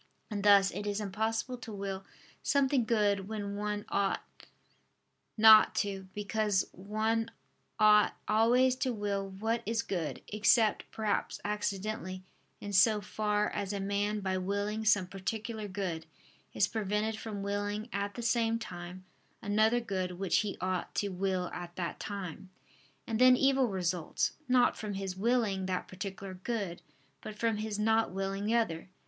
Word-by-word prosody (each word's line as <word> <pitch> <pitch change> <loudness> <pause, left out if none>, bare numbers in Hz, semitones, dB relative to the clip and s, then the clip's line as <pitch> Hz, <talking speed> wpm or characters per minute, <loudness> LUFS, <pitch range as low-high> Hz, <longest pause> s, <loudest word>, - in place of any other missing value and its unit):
And 205 -2 -3
thus, 200 -1 +6
it 205 - -5
is 205 0 -1
impossible 220 +5 -2
to 235 - -8
will 195 -1 -4 0.4
something 275 -3 +2
good 205 -4 +1
when 205 -2 -4
one 210 0 -3
ought 200 -1 0 1.1
not 220 0 +8
to, 195 -2 -2
because 205 -1 0
one 220 +4 -1 0.5
ought 210 0 +6
always 245 +4 +4
to 255 -1 0
will 200 -2 -2
what 220 +4 -2
is 225 +1 0
good: 170 -5 -3
except, 215 +1 +3
perhaps, 215 -2 -2
accidentally, 205 -2 -3 0.4
in 205 0 -6
so 210 +3 +5
far 210 0 -1
as 200 -1 -3
a 200 - -2
man 205 +2 -1
by 190 -1 -1
willing 200 +3 -2
some 200 -3 +4
particular 210 +3 -4
good, 185 -5 -4 0.4
is 200 - +2
prevented 215 +1 -1
from 210 -3 -5
willing 205 +2 -2
at 200 0 -2
the 240 - -5
same 230 0 +2
time 180 -3 -8 0.3
another 215 +3 +2
good 190 -5 -3
which 185 0 0
he 210 -2 -2
ought 185 0 -2
to 205 - 0
will 185 -1 -1
at 175 0 -7
that 175 -2 -4
time. 190 -3 -6 0.6
And 225 -1 -2
then 255 0 +8
evil 270 -1 +3
results, 180 -4 -1 0.2
not 250 -1 +4
from 210 -2 -5
his 195 -1 -4
willing 205 -3 +1
that 185 -1 -2
particular 190 +1 -6
good, 190 -2 -4 0.4
but 215 -1 -8
from 225 -1 +1
his 215 -1 -3
not 220 +1 +2
willing 195 +1 -3
the 225 +2 +2
other. 185 -7 0
205 Hz, 150 wpm, -31 LUFS, 195-220 Hz, 1.1 s, not